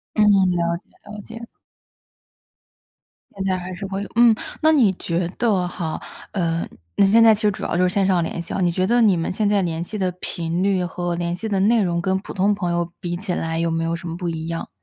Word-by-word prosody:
嗯， 215 - +3 0.3
了 170 -1 0
解 170 - -15 0.2
了 210 0 -7
解。 230 +2 -9 1.9
现 195 - -3
在 190 -1 +1
还 180 +1 -6
是 195 +2 -6
会 195 +1 -4
有 - - -6
嗯， 235 -1 +7 0.3
那 315 0 +5
你 240 -11 +4
觉 170 -1 -2
得 205 -7 +2
哈 160 -3 -4 0.3
呃， 170 -3 -1 0.3
那 195 - +5
现 225 +4 +5
在 225 -1 +8
其 215 - -6
实 210 - +4
主 195 - -7
要 - - -1
就 180 - +3
是 180 - -5
线 200 - +2
上 185 -3 +2
联 170 - -4
系 - - -7
啊， - - -1
你 175 -2 +2
觉 185 +2 0
得 240 +3 +3
你 210 -5 +5
们 165 - -2
现 210 +2 0
在 205 -1 +2
联 165 -1 -2
系 210 +5 -5
的 185 -2 0
频 170 +1 -2
率 190 -2 +1
和 175 0 -3
联 170 0 -2
系 220 +5 -4
的 200 -2 0
内 220 +3 +4
容， 170 -2 0
跟 190 +1 +1
普 195 - -8
通 200 +2 +2
朋 180 -4 -2
友 170 0 -1
比 175 -1 -4
起 190 +1 -4
来 165 0 -2
有 165 0 0
没 165 0 -1
有 165 - -1
什 170 0 -6
么 165 - -4
不 175 -1 -3
一 160 -1 -4
样？ 165 0 -4
185 Hz, 265 characters per minute, -22 LUFS, 170-205 Hz, 1.9 s, 在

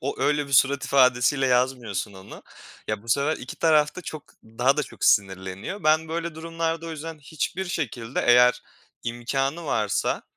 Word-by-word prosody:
o 140 - -4
öyle 150 -1 +1
bir 140 - -10
surat 135 +1 +4
ifadesiyle 130 +1 +3
yazmıyorsun 125 -6 0
onu. 95 0 -12 0.5
Ya 100 - -2
bu 115 - -17
sefer 140 +6 +1
2 125 - -9
taraf 155 -2 +3
da - - -5
çok 155 -1 -7 0.2
daha 120 +5 +1
da 150 - +1
çok - - -6
sinirleniyor. 95 - 0
Ben 155 +1 +3
böyle 170 0 -3
durumlarda 165 0 -3
o 165 - -5
yüzden 160 0 -7
hiçbir 160 +5 -4
şekilde 130 - -3
eğer 125 0 +5 0.4
imkânı 135 +7 -2
varsa, 105 -6 0
140 Hz, 160 wpm, -25 LUFS, 120-160 Hz, 0.5 s, eğer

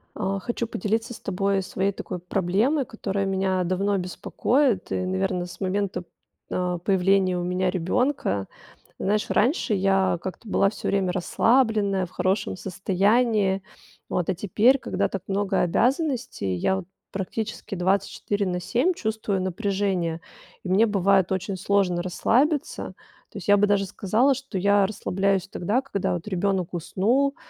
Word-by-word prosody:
А 195 -1 -1
хочу 235 +3 -3
поделиться 225 +4 -2
с - - -10
тобой 195 0 0
своей 190 +1 -1
такой 185 -2 -6
проблемой, 200 - +1
которая 200 -4 -3
меня 190 -1 0
давно 195 +3 0
беспокоит. 215 +5 0
И - - 0
наверно, 185 -1 -1
с 175 - -11
момента, 195 -1 -1 0.5
а, 180 -1 -1
появления 190 0 +2
у 175 - -2
меня 180 +1 0
ребёнка. 185 - 0 0.5
Знаешь, 210 +2 0
раньше 240 -1 +2
я 195 -1 +2
как-то 190 +4 -7
была 195 0 +3
всё 215 - -6
время 190 -2 +1
расслабленная, 200 +1 +2
в - - -13
хорошем 190 +2 0
состоянии. 195 +2 +1 0.5
Вот, 180 -1 -1
а 190 - +1
теперь, 215 +9 +3
когда - - -1
так 195 - -5
много 200 0 0
обязанностей, 250 - 0
я 190 - +1
вот 190 - -6 0.3
практически 205 +2 -4
24 200 +2 0
на 180 -1 -1
7 240 - +1
чувствую 215 - -2
напряжение, 190 -3 -1 0.4
и 185 - -5
мне 195 +5 +5
бывает 195 -3 +2
очень 190 +1 -2
сложно 190 -2 +1
расслабиться. 260 - 0 0.4
То - - -9
есть, - - -8
я 205 - +6
бы 205 - +4
даже 200 -1 +2
сказала, 215 +8 +2
что 265 -5 -5
я 200 +1 +4
расслабляюсь 195 -1 0
тогда, 205 +8 0
когда, 270 -11 -2
вот, 175 +3 -5
ребёнок 190 -2 -1
уснул, 230 - +1
195 Hz, 145 wpm, -25 LUFS, 185-215 Hz, 0.5 s, я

